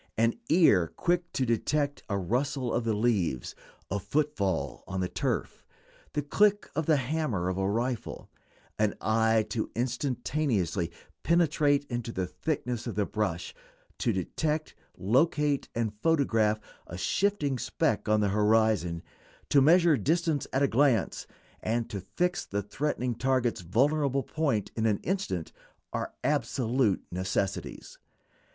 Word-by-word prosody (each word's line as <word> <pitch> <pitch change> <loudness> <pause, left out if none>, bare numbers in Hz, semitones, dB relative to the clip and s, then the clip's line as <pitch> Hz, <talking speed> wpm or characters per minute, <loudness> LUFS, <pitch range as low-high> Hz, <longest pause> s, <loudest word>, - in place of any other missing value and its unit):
An 115 +1 +3 0.2
ear 105 - +5
quick 175 0 0
to 130 - 0
detect 145 +5 0
a 100 - 0
rustle 125 +6 -1
of 120 - 0
the 110 -2 +1
leaves, 100 - 0 0.4
a 100 - 0
footfall 100 - -1
on 95 -1 -3
the 90 - 0
turf, - - -2 0.5
the 150 - -1
click 205 +7 +2
of 160 0 -1
the 155 -2 +5
hammer 125 - -1
of 95 +1 -2
a 95 0 +1
rifle; 120 +2 -2 0.5
an 105 -1 +2
eye 110 0 +2
to 110 - -2
instantaneously 120 - -1 0.3
penetrate 150 -3 +2
into 120 -2 -3
the 95 -4 -2
thickness 125 - -3
of 115 - -4
the 105 -1 +1
brush; 95 -6 -2 0.5
to 120 - +1
detect, 150 - -2 0.2
locate, 145 - +2
and 115 -2 -1
photograph 115 -9 +2 0.3
a 85 - -7
shifting 145 - 0
speck - - 0
on 105 0 +4
the 100 - +2
horizon; 105 -4 +2 0.5
to 140 - +5
measure 165 +1 +5
distance 155 - 0
at 135 +2 +1
a - - +5
glance, 130 -3 +2 0.3
and 115 +1 -1
to 100 -3 -4
fix 180 - -1
the 100 0 -3
threatening 125 +3 -2
target's 125 -2 0
vulnerable 135 - +1
point 140 -11 -1
in 115 0 +1
an 105 -2 +2
instant 180 - -2 0.4
are - - -3
absolute 120 -4 +1
necessities. 95 +1 -3
120 Hz, 135 wpm, -29 LUFS, 100-145 Hz, 0.5 s, ear